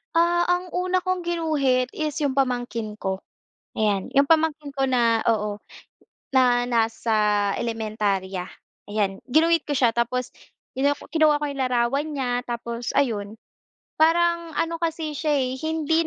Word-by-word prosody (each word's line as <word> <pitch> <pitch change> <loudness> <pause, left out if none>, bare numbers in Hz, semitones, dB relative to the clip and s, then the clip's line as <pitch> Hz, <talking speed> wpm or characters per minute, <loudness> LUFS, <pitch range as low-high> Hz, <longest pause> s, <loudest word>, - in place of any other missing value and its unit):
Ah, 345 +1 +3
ang 355 0 0
una 365 +1 +1
kong 370 -1 0
ginuhit 305 -7 0
is 305 -2 -3
yung 285 -3 0
pamangkin 245 -5 -1
ko, 190 -2 -3 0.6
ayan. 205 -3 0
Yung 280 - +6
pamangkin 305 -2 +1
ko 270 -1 0
na 235 -3 +3
oo, 210 -2 0 0.7
na 245 -2 +4
nasa 225 -1 0 0.4
elementarya, 210 -5 -2 0.5
ayan. 200 -2 -1
Ginuhit 330 +4 +4
ko - - -10
siya 235 -3 +3
tapos 245 +1 -1 0.4
kinu 280 +2 +1 0.2
kinuha 310 -2 +4
ko 295 - -3
yung 280 -2 -3
larawa 250 +1 +1
n 310 - -7
niya 255 -2 -1
tapos 235 -1 -4
ayun. 220 -5 -1 0.6
Parang 335 0 +2
ano 330 +2 -1
kasi 320 -3 -3
siya, 305 -2 +1
eh, 260 -2 -1
hindi 320 +1 0
265 Hz, 140 wpm, -24 LUFS, 230-320 Hz, 0.7 s, Yung